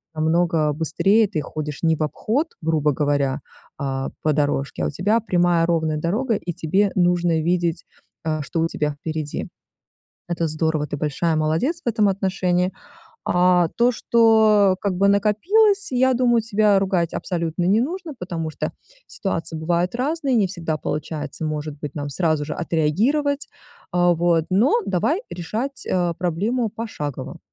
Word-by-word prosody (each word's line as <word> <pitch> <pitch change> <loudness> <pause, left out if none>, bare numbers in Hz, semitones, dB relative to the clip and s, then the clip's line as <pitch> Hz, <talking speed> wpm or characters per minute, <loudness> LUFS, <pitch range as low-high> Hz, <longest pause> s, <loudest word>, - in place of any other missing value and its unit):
намного 160 -1 +2
быстрее, 195 +8 +2
ты 165 -6 -2
ходишь 150 -1 -5
не 160 -1 +3
в 155 - -2
обход, 230 - -1
грубо 155 -2 +1
говоря, 145 -1 0 0.4
а 135 -1 -3
по 155 - +2
дорожке, 145 -2 -1
а - - +1
у - - -2
тебя 205 +9 +1
прямая 175 -5 +2
ровная 160 -2 0
дорога, 215 - 0
и 175 -3 -4
тебе 190 +4 +1
нужно 175 -2 +2
видеть, 170 0 0 0.4
а, 155 -1 -1
что 160 +3 -2
у 165 - +2
тебя 150 -2 -2
впереди. 155 -2 -4 0.8
Это 170 -1 -1
здорово, 155 -1 -1
ты 145 - -4
большая 155 +3 0
молодец 160 - 0
в - - -10
этом 215 -3 +3
отношении. 185 -1 0 0.5
А 180 -1 +3
то, 240 +1 +4
что, 220 -4 +4
как 200 -2 0
бы, 200 +2 +3
накопилось, 390 - +3
я 260 +1 +3
думаю, 240 -2 +3
тебя 210 -2 +3
ругать 185 -4 0
абсолютно 170 -1 -2
не 200 +5 +3
нужно, 335 +5 -3
потому 165 -3 -4
что - - -4 0.3
ситуации 165 -4 -4
бывают 170 +4 0
разные, 275 +2 0
не 215 -4 +3
всегда 170 -4 -3
получается, 155 +1 -4
может 150 -1 -4
быть, 145 -1 -6
нам 145 -1 -4
сразу 155 -1 0
же 150 - -5
отреагировать, 230 - 0 0.4
а 175 0 +4
вот, 170 -1 +2
но 215 - +3
давай 295 - 0
решать, 225 +11 -4
а, 175 -2 +1
проблему 195 +8 -1
пошагово. 200 - -6
175 Hz, 155 wpm, -22 LUFS, 155-215 Hz, 0.8 s, то